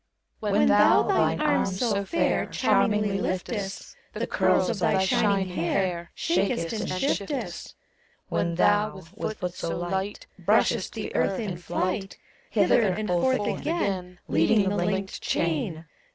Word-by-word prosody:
When 75 - +2
thou 70 - +5
thine - - +2
arms 190 -1 +1
so 205 -5 +1
fair 335 - 0
Charmingly 210 -2 +1
lif 185 -1 -1
test, 200 -4 -6 0.2
The - - -2
curls - - +2
of 220 - -4
thy 190 +1 +2
shining 195 -1 +2
hair 175 0 -1
Shakest 175 0 0
and 220 0 -3
shiftest; 245 +5 -3 0.5
When 170 -1 -1
thou, 205 +1 +2
with 215 0 -4
foot 180 -1 -4
so 165 -2 -4
light, 190 +3 -3 0.2
Btushest - - +2
the - - -6
earth 195 - +1
in 205 -5 -3
flight, 185 +3 -3 0.3
Hither 205 +2 +3
and 210 0 0
forth 205 +6 +1
again 190 - -2
Leading 195 +5 +3
the 205 - -1
linked 195 +1 -2
chain. 165 0 -1
195 Hz, 140 wpm, -26 LUFS, 180-210 Hz, 0.5 s, thou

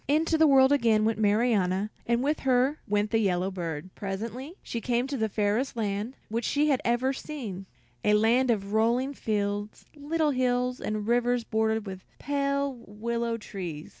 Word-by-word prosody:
Into 315 +3 +2
the 315 0 +5
world 265 -1 +6
again 230 -6 +3
went 225 0 0
Marianna, 210 -2 +2 0.2
and 235 +1 +2
with 295 +2 0
her 260 +3 +2
went 205 +1 0
the 225 - +3
yellow 190 -2 +1
bird. 170 -1 -5
Presently 230 - -5
she 235 - -4
came 240 +1 0
to 275 +1 -4
the 220 -4 0
fairest 215 +6 0
land 210 +3 -2
which 230 +2 -2
she 295 +5 +2
had 270 -3 +2
ever 240 +3 +1
seen, 225 -11 -6 0.4
a 210 - +4
land 235 +4 +3
of 200 -3 0
rolling 240 +5 +2
fields, 205 -3 -2
little 300 +1 0
hills, 250 -1 0
and 215 -1 -3
rivers 245 0 +2
bordered 220 -1 0
with 190 -2 -7
pale 280 -2 -1
willow 230 +2 -2
trees. 175 -8 -7
230 Hz, 165 wpm, -28 LUFS, 205-260 Hz, 0.4 s, world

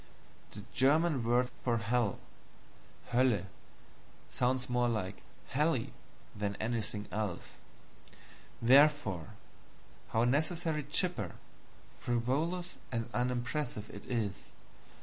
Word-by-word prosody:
The 105 - -9
German 145 0 +3
word 125 +2 +2
for 120 -2 +2
hell 115 -1 +1 0.9
Hoelle 120 -6 +3 0.9
sounds 125 +1 +1
more 120 0 +2
like 95 -4 -2 0.3
HELLY 150 -4 +1 0.4
than 100 -1 -2
anything 110 -2 -2
else; 105 -4 -3 1.0
therefore, 130 - +4 0.7
how 115 - +2
necessarily 155 +4 +1
chipper, 140 - 0 0.7
frivolous, 150 +10 -1
and 115 -1 -2
unimpressive 125 -1 -1
it 100 - -9
is. 110 -6 -2
120 Hz, 90 wpm, -33 LUFS, 110-140 Hz, 1.0 s, therefore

